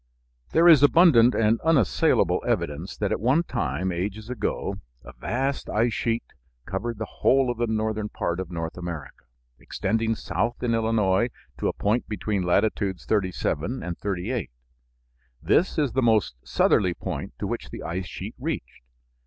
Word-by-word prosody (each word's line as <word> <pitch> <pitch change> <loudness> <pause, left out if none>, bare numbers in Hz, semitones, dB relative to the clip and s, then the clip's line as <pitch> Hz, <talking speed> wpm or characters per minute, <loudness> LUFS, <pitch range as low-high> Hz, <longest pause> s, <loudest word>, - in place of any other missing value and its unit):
There 170 +2 +5
is 160 -5 +8
abundant 145 -5 +6
and 115 +1 +2
unassailable 155 - +2
evidence 75 +6 -2
that 105 - -1
at - - 0
one 130 +9 +3
time, 90 - -2
ages 105 +6 -4
ago, 105 -4 -2 0.3
a - - -11
vast 135 +3 -2
ice 115 +2 +1
sheet 115 +1 -1 0.4
covered 115 +4 -3
the 110 - -3
whole 130 +2 +2
of 120 - -7
the 120 - +1
northern 110 -1 -1
part 85 -3 -2
of 95 -2 -4
North 85 0 -5
America, 85 -7 -7 0.3
extending 110 +3 -1
south 110 +8 -2
in 120 -1 +1
Illinois 110 -1 +2 0.3
to - - 0
a - - 0
point 110 +4 0
between 105 -2 -2
latitudes 95 +1 0
37 100 - -1
and 85 -1 -4
38. 100 +6 -3 0.9
This 105 - +2
is 145 -5 +1
the 130 - +1
most 110 - +3
southerly 90 -4 +2
point - - -5
to - - -4
which - - -4
the - - -8
ice 90 +2 -4
sheet - - -7
reached. - - -5
110 Hz, 155 wpm, -25 LUFS, 95-120 Hz, 0.9 s, is